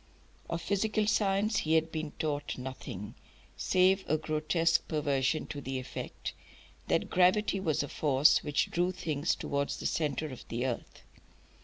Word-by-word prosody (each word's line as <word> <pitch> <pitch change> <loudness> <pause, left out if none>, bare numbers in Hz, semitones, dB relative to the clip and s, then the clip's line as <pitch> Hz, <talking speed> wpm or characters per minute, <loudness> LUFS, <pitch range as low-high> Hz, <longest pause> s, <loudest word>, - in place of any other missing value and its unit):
Of 170 0 -3
physical 210 +3 +1
science 205 0 +2
he 160 +1 +2
had 160 0 +2
been 155 -2 -4
taught 145 -2 -2
nothing, 125 -5 -6 0.4
save 190 +1 +3
a 155 - +3
grotesque 155 +2 +1
perversion 145 -1 0
to 145 - -5
the 135 0 -3
effect 130 - -6 0.5
that - - 0
gravity 190 +3 +3
was 155 -6 0
a - - -4
force 140 0 +4
which 150 0 0
drew 175 +1 +1
things 155 -2 -1
towards 140 0 -2
the - - -7
centre 155 -1 0
of 130 - -9
the 120 +2 -2
earth. 125 -3 -4
155 Hz, 150 wpm, -31 LUFS, 140-180 Hz, 0.5 s, force